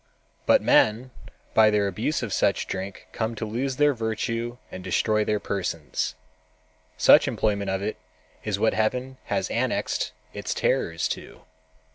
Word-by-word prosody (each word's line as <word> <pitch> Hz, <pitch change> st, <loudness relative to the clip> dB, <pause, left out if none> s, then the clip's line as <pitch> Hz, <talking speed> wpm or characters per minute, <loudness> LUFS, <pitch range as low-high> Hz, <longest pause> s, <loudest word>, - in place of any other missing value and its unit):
But -, -, +5 dB
men 115 Hz, +4 st, +3 dB, 0.4 s
by 110 Hz, -1 st, +6 dB
their 105 Hz, -1 st, +2 dB
abuse 95 Hz, -, -1 dB
of -, -, -3 dB
such -, -, +2 dB
drink 95 Hz, +1 st, -6 dB
come 115 Hz, 0 st, -2 dB
to 110 Hz, -, -4 dB
lose 125 Hz, +5 st, -2 dB
their 145 Hz, +1 st, +4 dB
virtue 115 Hz, +1 st, -2 dB
and 95 Hz, -, -7 dB
destroy 110 Hz, +2 st, +1 dB
their 105 Hz, 0 st, 0 dB
persons—such 80 Hz, -3 st, 0 dB
employment 100 Hz, -2 st, 0 dB
of 95 Hz, +1 st, -1 dB
it 105 Hz, -, -3 dB, 0.5 s
is 105 Hz, -3 st, -1 dB
what 110 Hz, +2 st, +2 dB
Heaven 125 Hz, +5 st, -1 dB
has -, -, -1 dB
annexed -, -, -1 dB, 0.2 s
its -, -, -3 dB
terrors 80 Hz, 0 st, +1 dB
to. -, -, -6 dB
105 Hz, 140 wpm, -25 LUFS, 95-115 Hz, 0.5 s, by